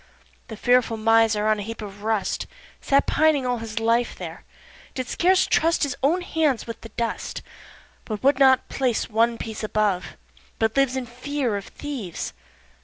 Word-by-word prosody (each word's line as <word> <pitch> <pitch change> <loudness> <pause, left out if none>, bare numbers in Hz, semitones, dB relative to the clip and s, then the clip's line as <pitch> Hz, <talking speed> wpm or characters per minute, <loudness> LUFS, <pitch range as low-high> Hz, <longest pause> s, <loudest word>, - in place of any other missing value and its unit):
3. - - -31
The 220 - -8
fearful 245 -1 +2
miser 225 -1 +3
on 215 -1 +2
a - - -3
heap 225 +3 -6
of 205 -2 -8
rust 220 -1 -1 0.3
Sat 275 0 +3
pining 305 -3 +3
all 245 -1 0
his 225 0 -4
life 230 +2 +1
there, - - -8 0.5
did 255 -1 -3
scarce 370 +6 +3
trust 330 +1 +2
His 280 -3 -1
own 320 +7 +2
hands 310 -8 0
with 230 -1 -7
the 225 - -10
dust, 230 +2 -4 0.6
But 215 0 -5
would 275 0 +4
not 265 -1 +5
place 250 -4 -1
one 230 +2 +2
piece 220 -1 -6
above, 210 -4 -1 0.4
but 220 0 0
lives 275 -2 +2
In 260 -1 -2
fear 250 0 -2
of 200 - -4
thieves. 255 - -6
235 Hz, 175 wpm, -24 LUFS, 220-275 Hz, 0.6 s, not